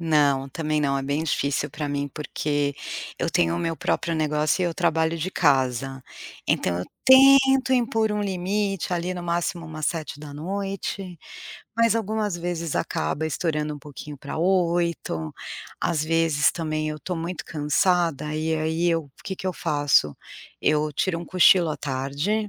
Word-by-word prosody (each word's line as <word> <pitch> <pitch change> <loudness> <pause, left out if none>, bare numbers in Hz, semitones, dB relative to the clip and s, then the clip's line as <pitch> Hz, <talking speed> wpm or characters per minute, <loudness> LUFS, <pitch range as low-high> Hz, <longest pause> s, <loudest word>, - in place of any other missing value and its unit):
Não, 145 -4 +2
também 155 +1 -1
não, 140 -2 +1
é - - -3
bem 145 +4 -1
difícil 140 -1 0
pra 150 0 -4
mim, 145 0 -1
porque 145 0 -2 0.5
eu - - 0
tenho 85 0 +2
o - - -2
meu 165 - -2
próprio 170 +1 -1
negócio 155 +2 +1
e - - +3
eu 175 - 0
trabalho 165 -1 +1
de 165 - -2
casa, 135 -5 +1 0.5
então 85 -1 +1
eu 90 - -3 0.2
tento 270 0 +7
impor 225 -3 +2
um 210 - -1
limite 195 0 -1
ali 175 +1 -2
no 180 - -5
máximo 170 0 -1
umas 155 -1 -4
19h00, 175 +4 -4 0.6
mas 230 0 +4
algumas 215 -3 -1
vezes 170 -2 -3
acaba 110 - -1
estourando 150 -1 -1
um - - -9
pouquinho 145 +1 -9
pra 140 +3 -6
20h, 170 - 0 0.5
às 155 -2 0
vezes 160 -2 +2
também 155 -2 -2
eu 155 0 -5
tô 180 +3 -4
muito 170 +2 -4
cansada, 150 0 +1
e 160 +1 0
aí 160 +2 0
eu 165 -1 0
o - - -23
que 195 - -3
que 190 - -6
eu - - -1
faço, 145 - +2 0.5
eu 150 0 +2
tiro 165 +3 0
um 170 - -6
cochilo 180 -2 +5
à 150 - -3
tarde, 145 +11 -2
160 Hz, 165 wpm, -24 LUFS, 145-180 Hz, 0.6 s, tento